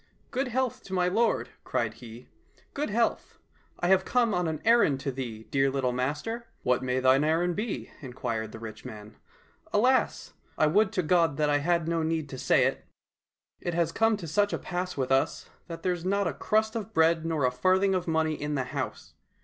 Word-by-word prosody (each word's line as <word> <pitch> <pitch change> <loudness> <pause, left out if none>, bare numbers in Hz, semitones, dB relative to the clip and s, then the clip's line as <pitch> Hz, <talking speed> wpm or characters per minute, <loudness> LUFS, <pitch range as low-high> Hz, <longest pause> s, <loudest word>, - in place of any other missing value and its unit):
" - - -40
Good 265 +1 -1
health 255 0 -1
to 190 - -8
my 180 -1 +2
lord! 225 +6 +1
" - - -42
cried 115 -2 -1
he.—" 115 +1 -12 0.5
Good 295 +1 -2
health! 230 +2 -1
"— - - -36
" - - -32
I 175 - +1
have 190 0 +5
come 235 0 +2
on 180 -2 0
an 155 -2 -2
errand 230 - +4
to 140 - -2
thee, 120 -4 -6
dear 135 0 +3
little 135 -2 0
master! 150 - -3
" - - -38
— - - -39
" - - -40
What 125 0 +2
may 130 0 0
thine 130 +2 +4
errand 165 +3 +1
be? 215 +1 -4
" - - -22
inquired 115 -5 -4
the - - -8
rich 110 -1 -9
man. 105 0 -10 0.2
— - - -30
" - - -29
Alas! 250 +6 +2 0.3
would 190 +7 +3
to 185 - 0
God 165 -3 +2
that 150 -1 +2
I 145 - +3
had 170 +2 +1
no 165 0 0
need 160 -2 -1
to 130 - -7
say - - +3
it. - - -1 0.8
It 175 - -3
has 170 -1 +1
come 225 +2 +2
to 175 -4 -7
such 205 +6 +1
a - - 0
pass 180 -1 -4
with 130 -1 -1
us 135 0 0 0.2
that 165 -1 -8
there's 180 -2 -1
not 200 +2 +1
a - - -1
crust 220 +1 0
of 220 -1 -5
bread 160 0 +4
nor 160 -4 0
a 125 - +2
farthing 185 +9 +2
of 185 -2 -1
money 160 -1 +1
in 150 0 -3
the 135 - 0
house. 125 - -5
165 Hz, 230 wpm, -28 LUFS, 135-200 Hz, 0.8 s, have